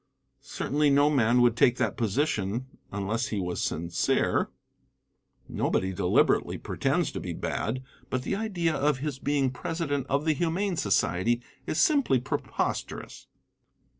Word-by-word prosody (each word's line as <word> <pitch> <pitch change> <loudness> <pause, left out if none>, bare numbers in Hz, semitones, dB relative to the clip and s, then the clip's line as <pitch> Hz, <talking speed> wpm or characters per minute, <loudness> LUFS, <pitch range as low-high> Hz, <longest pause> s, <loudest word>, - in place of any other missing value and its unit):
Certainly 150 +1 0
no 145 +1 +4
man 125 -3 +3
would 120 -2 +4
take 120 +1 +4
that - - 0
position 115 -1 0 0.3
unless 100 +5 -1
he 105 - -2
was 90 -2 -2
sincere. 85 +2 0 1.0
Nobody 95 0 0
deliberately 90 -1 +2
pretends - - 0
to - - -5
be - - -5
bad, 130 +4 -3 0.3
but 130 0 -2
the 195 - -1
idea 190 -6 -1
of 145 -1 +1
his 140 -1 -4
being 140 -2 +1
president 145 0 -3
of 140 +3 0
the 160 - +3
Humane 175 +5 0
Society 105 - +1 0.2
is 155 - -1
simply 280 - +4
preposterous. 125 - -3
130 Hz, 135 wpm, -28 LUFS, 110-150 Hz, 1.0 s, no